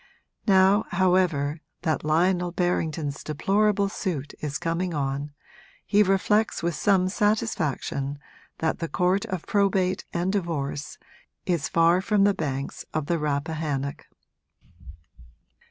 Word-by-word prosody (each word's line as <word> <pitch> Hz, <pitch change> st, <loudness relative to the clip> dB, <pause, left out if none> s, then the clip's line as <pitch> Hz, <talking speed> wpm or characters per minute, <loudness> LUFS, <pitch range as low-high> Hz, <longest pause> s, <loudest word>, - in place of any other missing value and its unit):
Now, 195 Hz, +1 st, +5 dB
however, 175 Hz, -5 st, +1 dB, 0.2 s
that 155 Hz, -2 st, 0 dB
Lionel 175 Hz, +3 st, +2 dB
Berrington's 160 Hz, -5 st, -1 dB
deplorable 200 Hz, +6 st, +1 dB
suit 170 Hz, -8 st, -4 dB
is 145 Hz, -1 st, -3 dB
coming 170 Hz, +1 st, -2 dB
on 140 Hz, +1 st, -2 dB, 0.5 s
he 205 Hz, -, +4 dB
reflects 210 Hz, +1 st, +2 dB
with 170 Hz, 0 st, 0 dB
some 190 Hz, +1 st, +2 dB
satisfaction 185 Hz, -, -1 dB, 0.4 s
that 160 Hz, -, -1 dB
the 165 Hz, -, -2 dB
Court 180 Hz, +2 st, +1 dB
of 185 Hz, -3 st, -4 dB
Probate 195 Hz, -2 st, +1 dB
and 180 Hz, +3 st, -1 dB
Divorce 155 Hz, -7 st, -3 dB, 0.5 s
is 170 Hz, -5 st, 0 dB
far 170 Hz, +2 st, +4 dB
from 205 Hz, 0 st, +2 dB
the 200 Hz, 0 st, +4 dB
banks 140 Hz, -5 st, -4 dB
of 155 Hz, -2 st, 0 dB
the 170 Hz, +2 st, 0 dB
Rappahannock. 145 Hz, -1 st, -2 dB
175 Hz, 115 wpm, -25 LUFS, 150-190 Hz, 0.5 s, Now